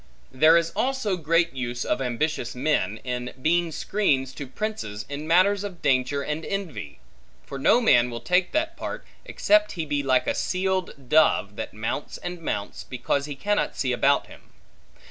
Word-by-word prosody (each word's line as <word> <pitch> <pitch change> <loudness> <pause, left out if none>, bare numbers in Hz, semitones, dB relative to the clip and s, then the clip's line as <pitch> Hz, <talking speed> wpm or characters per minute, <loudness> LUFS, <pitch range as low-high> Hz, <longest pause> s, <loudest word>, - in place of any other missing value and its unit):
There 155 +6 +6
is 165 0 0
also 260 -7 0
great 165 0 +1
use 125 -2 -3
of - - 0
ambitious 125 0 -2
men, 125 -7 0
in 125 0 -4
being 170 +4 +1
screens 140 -9 0
to 140 -1 -7
princes 130 - -4
in 145 +2 -6
matters 190 +4 +4
of 190 -4 -7
danger 135 +1 +1
and 150 +3 -3
envy; 155 - -5 0.5
for 140 - -7
no 185 - +5
man 125 - +4
will 120 -1 -5
take 180 +4 +1
that 325 +2 -1
part, - - -6 0.2
except 315 0 +2
he 165 -5 -3
be 145 -1 -1
like 130 -2 +2
a - - +1
seeled 185 -7 -2
dove, 120 -8 +3
that - - -5
mounts 110 +6 -4
and 175 -1 -6
mounts, 105 -10 -4
because 130 +3 -2
he 145 -1 -6
cannot 205 +8 -1
see 130 -3 0
about 135 +3 +3
him. - - -16
150 Hz, 170 wpm, -25 LUFS, 125-180 Hz, 0.5 s, There